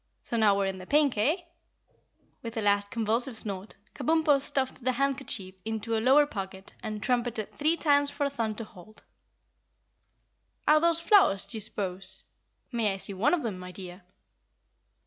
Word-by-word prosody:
"So - - -3
now 210 -3 +4
we're 200 - +1
in 190 -1 -3
the 185 - -10
pink, 290 -3 +3
eh?" 290 - +1 1.0
With 230 0 -7
a - - 0
last 200 -1 +2
convulsive 230 +2 -1
snort, 200 -1 -3 0.2
Kabumpo 300 0 +2
stuffed 265 -2 0
the 255 +1 +1
handkerchief 265 -8 -2
into 225 +1 -2
a 220 - 0
lower 270 +5 +6
pocket 195 -6 -7
and 215 -3 -5
trumpeted 240 -4 -1
three 315 +3 +1
times 285 -3 +3
for 285 0 -1
Thun 230 -6 -2
to 230 - -5
halt. 215 0 -15 1.6
"Are 305 +1 +6
those 335 0 +3
flowers, 335 - +4
d'ye 225 - -1
'spose? 190 -3 -4 0.5
May 220 -5 0
I - - -6
see 195 - -1
one 205 - +2
of 325 - -5
them, 210 -6 -3
my 180 0 -8
dear?" 180 0 -9
225 Hz, 165 wpm, -28 LUFS, 200-275 Hz, 1.6 s, lower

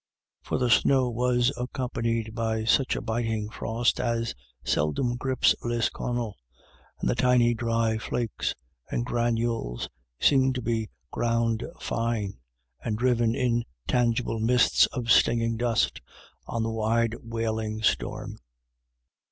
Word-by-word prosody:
For - - -2
the 125 -2 +1
snow 130 +3 +4
was 125 +2 +2
accompanied 115 -3 -2
by 110 -1 -1
such 130 +3 +3
a - - -3
biting 110 -2 -2
frost 115 +2 0
as 115 -2 -1 0.3
seldom 120 - +1
grips 130 0 +2
Lisconnel, 120 -1 -2 0.6
and - - -1
the - - +3
tiny 125 -1 +4
dry 115 -1 0
flakes 115 0 -2 0.3
and 120 - -1
granules 115 - -1 0.3
seemed 130 -2 +4
to 125 - -2
be 110 -2 -1 0.2
ground 115 -1 0 0.2
fine 115 - -2 0.4
and 110 -2 -1
driven 120 -1 +2
in 120 -2 +1 0.2
tangible 120 -2 +1
mists 125 +3 +4
of 125 -4 -2
stinging 115 0 +4
dust 115 - 0 0.5
on 115 -1 -2
the 115 - -1
wide 115 +1 +1
wailing 110 -1 -3
storm. - - -1
115 Hz, 120 wpm, -27 LUFS, 115-120 Hz, 0.6 s, snow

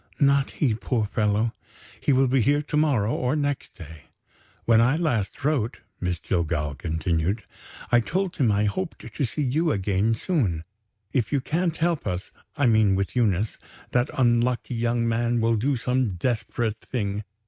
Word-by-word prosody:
"Not 140 -1 +3
he, 130 -7 +1
poor 110 0 -1
fellow! 105 +1 0 0.5
He - - +1
will 135 0 +4
be 130 0 +3
here 145 +5 +2
to 150 - -4
morrow 135 -8 +2
or 125 +3 0
next 145 -2 -2
day. 80 -3 -11 0.6
When 115 -1 +5
I 125 +5 +4
last 145 - -1
wrote," 135 -7 0 0.2
Miss 90 -2 -2
Jillgall 80 -4 -1
continued, 80 - -1 0.5
"I 120 - +6
told 185 +8 -2
him 120 -6 +3
I 105 +1 +2
hoped 175 - -2 0.2
to 140 - 0
see 145 +6 -3
you 155 +5 +1
again 100 +2 +1
soon. 110 - 0 0.5
If 115 -6 0
you 140 - +2
can't 165 +4 -1
help 165 -1 0
us 90 +1 -3 0.3
(I 140 - +2
mean 110 -4 +4
with 100 +4 -2
Eunice) 110 -3 +1 0.3
that 125 0 +2
unlucky 120 0 +2
young 115 0 0
man 120 +1 +1
will 115 0 +2
do 135 +6 +1
some 125 -4 0
desperate 110 +1 -1
thing. 105 -4 -3
115 Hz, 165 wpm, -25 LUFS, 100-140 Hz, 0.6 s, I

